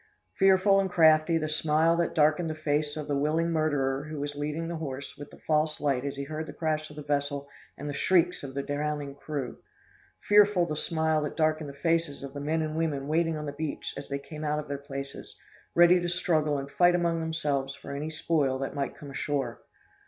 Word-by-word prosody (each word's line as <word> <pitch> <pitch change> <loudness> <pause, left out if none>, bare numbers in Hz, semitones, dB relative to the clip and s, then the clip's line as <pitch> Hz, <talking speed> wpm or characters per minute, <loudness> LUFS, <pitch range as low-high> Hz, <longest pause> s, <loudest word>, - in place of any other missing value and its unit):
Fearful 195 +1 +5
and 195 -1 +1
crafty 160 -1 +5
the 155 -1 -1
smile 155 +2 +2
that 170 -1 0
darkened 155 +2 +3
the 155 - -3
face 150 -1 -1
of 150 - -5
the 145 - 0
willing 155 +4 +1
murderer 145 -4 0
who 155 -1 -6
was 145 0 -3
leading 150 +3 -3
the 170 0 -3
horse 140 -3 -6
with 145 0 -9
the - - -15
false 155 0 0
light 140 -3 0
as 140 0 -3
he 140 - -4
heard 155 +2 -5
the - - -7
crash 155 -1 -1
of 150 - -12
the 150 - -7
vessel 145 -1 -1 0.3
and 145 - -6
the 145 - -3
shrieks 175 +3 +2
of 135 -1 -8
the 140 - -1
drowning 145 0 -2
crew! 140 -3 -5 0.7
Fearful 205 -3 +6
the 155 - -3
smile 160 0 +1
that 150 - -3
darkened 155 -2 +1
the 140 - -10
faces 165 -4 +1
of 135 -1 -7
the 145 - -5
men 160 +2 0
and 155 0 -3
women 150 -4 -1
waiting 165 +1 +1
on 150 - -5
the 145 - -3
beach 150 +1 -4
as - - -8
they 140 - -1
came 150 +2 -8
out 150 0 0
from 150 -1 -7
their 140 -1 -3
places, 140 0 -8 0.4
ready 175 +1 +7
to 175 - -1
struggle 155 -4 +1
and 140 0 -6
fight 175 0 +4
among 170 -1 +1
themselves 145 -4 -1
for - - -10
any 150 +2 -3
spoil 155 -4 0
that 135 0 -4
might 140 -1 -3
come 145 -2 -9
ashore! 140 0 -2
155 Hz, 220 wpm, -28 LUFS, 145-165 Hz, 0.7 s, ready